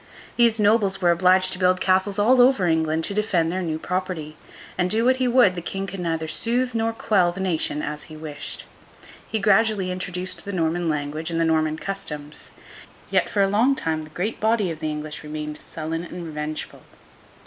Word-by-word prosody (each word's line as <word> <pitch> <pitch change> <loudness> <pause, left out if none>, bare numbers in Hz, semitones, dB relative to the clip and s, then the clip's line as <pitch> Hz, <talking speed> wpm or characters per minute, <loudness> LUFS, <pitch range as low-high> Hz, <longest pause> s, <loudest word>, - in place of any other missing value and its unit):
These 230 -2 +4
nobles 205 -2 +3
were 175 -2 +4
obliged 185 +2 +3
to 185 - -6
build 185 0 +3
castles 190 +2 +2
all 245 +5 +5
over 245 -7 +4
England, 160 -1 +1
to 200 - -1
defend 190 -6 +1
their 185 +1 -2
new 160 -3 -2
property; 180 -3 -4 0.4
and, 180 0 0
do 225 +4 +1
what 255 +1 +4
he 255 -1 +1
would, 245 -6 +5
the 175 - -5
King 195 +3 -4
could 195 -1 -7
neither 165 -2 -2
soothe 245 +8 0
nor 225 0 0
quell 195 -6 +2
the 185 - -9
nation 165 -5 -1
as 150 0 -5
he 155 - -11
wished. 155 -1 -7 0.6
He 220 - -1
gradually 205 -2 +2
introduced 180 0 -4
the 200 - -6
Norman 170 -1 0
language 150 +2 -3
and 165 -1 -1
the 165 - +3
Norman 155 -1 +1
customs; 150 -6 -5 0.6
yet, - - +2
for 200 - +2
a - - +3
long 230 +8 +3
time 160 -8 -2
the 155 - -12
great 180 +8 -3
body 215 -4 +1
of 160 - -7
the 155 -1 -2
English 150 0 -5
remained 150 0 -6
sullen 165 +1 -5
and 175 0 -7
revengeful. 155 -1 -5
180 Hz, 195 wpm, -23 LUFS, 160-205 Hz, 0.6 s, all